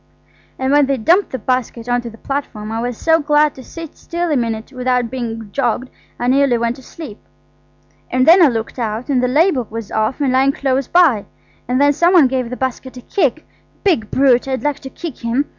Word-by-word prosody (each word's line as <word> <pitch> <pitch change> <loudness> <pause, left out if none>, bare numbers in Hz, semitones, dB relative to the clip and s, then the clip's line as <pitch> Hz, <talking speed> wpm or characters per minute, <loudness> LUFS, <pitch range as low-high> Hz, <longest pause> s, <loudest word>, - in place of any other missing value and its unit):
"And 260 +1 -1
when 290 -1 +4
they 275 -1 0
dumped 345 - +3
the 260 - -4
basket 245 -1 -2
on 245 0 +1
to 240 - -7
the 225 - -14
platform 235 -7 -5
I 225 +1 -2
was 245 -1 -3
so 325 0 +3
glad 295 0 +2
to 260 - -12
sit 330 +1 -9
still 345 0 -3
a - - +2
minute 230 0 -2
without 250 -2 0
being 225 -4 -5
jogged 250 0 -1 0.3
I 245 - -2
nearly 260 -1 +3
went 235 +2 -1
to - - -13
sleep. 255 -4 -10 0.9
And 255 0 +2
then 345 +4 +7
I 330 - +8
looked 230 0 -3
out, 225 +3 -3
and 260 -3 +2
the 250 - +1
label 285 - +2
was 225 -1 -7
off, 220 +5 -1
and 275 -3 +1
lying 270 +1 +3
close 270 -2 -1
by. 315 - +3 0.4
And 250 +2 0
then 285 0 +4
some 345 +5 +3
one 325 -6 +7
gave 255 -2 -2
the 250 - -6
basket 260 0 -4
a - - -8
kick–big 310 - -2
brute, 265 -1 +3
I'd 265 0 -2
like 295 -1 -1
to 265 - -9
kick 325 -1 -8
him! 240 +5 0
260 Hz, 215 wpm, -18 LUFS, 235-285 Hz, 0.9 s, I